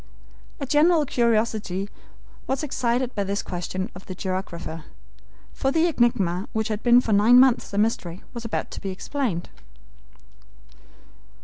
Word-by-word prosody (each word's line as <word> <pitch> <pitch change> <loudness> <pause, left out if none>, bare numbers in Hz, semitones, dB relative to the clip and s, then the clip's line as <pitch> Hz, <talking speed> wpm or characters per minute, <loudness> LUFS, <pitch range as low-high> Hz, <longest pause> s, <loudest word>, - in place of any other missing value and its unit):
A 280 - -3
general 305 +3 +4
curiosity 220 -6 0 0.6
was 265 +2 -1
excited 250 -2 -1
by 200 - -1
this 200 +1 -2
question 185 +1 -4
of 185 0 -12
the 185 - -6
geographer, 175 -4 -5 0.7
for 270 - 0
the 325 +3 +3
enigma 235 - +1
which 220 0 -1
had 215 0 -2
been 240 0 +6
for 225 - 0
nine 220 +5 +6
months 260 -2 +4
a 200 - -4
mystery 195 -5 -1
was 235 -2 -6
about 230 - -3
to - - -7
be 195 - -4
explained. 190 -1 -3
220 Hz, 140 wpm, -24 LUFS, 190-250 Hz, 0.7 s, been